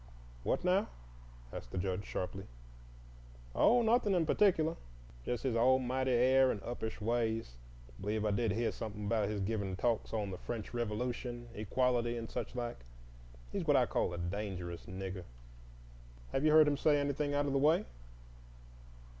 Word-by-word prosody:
"What - - 0
now?" 185 +4 +3 0.7
asked - - -7
the - - -6
Judge, 95 +2 -2
sharply. 95 +1 -4 1.1
"Oh, 240 +1 +5
nothin' 225 -3 +3
in 170 -2 +2
particulah,—just 115 - 0
his 130 -4 0
almighty 130 +2 +2
air 130 +2 +5
and 105 - -1
uppish 110 -2 -4
ways. 115 - -1 0.4
B'lieve 105 +2 -1
I 105 - +2
did 110 0 +1
heah 115 +2 0
somethin' 105 -2 -6
about 105 -1 +1
his 105 -1 -2
givin' 100 -2 -1
talks 115 +3 0
on 105 -3 -2
the 90 - -6
French 115 -2 -5
Revolution, 120 +1 -3
equality, 120 +2 0
and 115 -1 -6
such - - -4
like. 120 - -3 0.7
He's - - -3
what - - +5
I - - +4
call - - 0
a 85 - -5
dangerous 90 -1 -4
Nigger." 95 -1 -5 1.1
"Have 135 - 0
you 155 - +5
heard 155 -1 +7
him 145 -1 +2
say 145 0 +3
anything 145 0 -1
out 145 0 +2
of 140 - -1
the 135 - +3
way?" 150 +4 +4
115 Hz, 155 wpm, -34 LUFS, 100-135 Hz, 1.1 s, heard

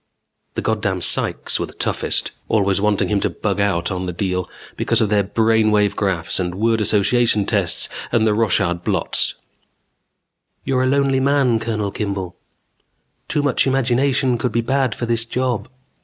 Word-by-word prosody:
The - - -3
goddam 105 -4 -1
psychs - - -1
were - - -2
the - - -14
toughest, - - 0 0.2
always 100 -2 +2
wanting 105 -1 +1
him 105 -1 +1
to - - 0
bug 100 -2 -3
out 100 -3 0
on 90 0 -3
the - - -2
deal 90 0 -2 0.3
because 115 - +1
of 110 -3 +1
their 105 -1 +2
brainwave 110 -1 +2
graphs 95 -5 -1
and 90 -1 -2
word 110 +2 +1
association 105 +1 +3
tests 100 -6 +1 0.2
and 110 -2 +2
their 110 - +3
Rorschach 95 -5 +1
blots. - - 0 1.3
"You're 130 -1 0
a 130 - +2
lonely 135 0 +2
man, 135 -4 +2
Colonel 110 -3 -2
Kimball 100 -4 -4 0.5
" - - -48
"Too 145 - 0
much 140 -1 +2
imagination 130 -1 +1
could 125 - -1
be 115 - +1
bad 130 -1 0
for 120 - -3
this 115 0 +1
job." 125 -1 -2
110 Hz, 165 wpm, -20 LUFS, 100-120 Hz, 1.3 s, association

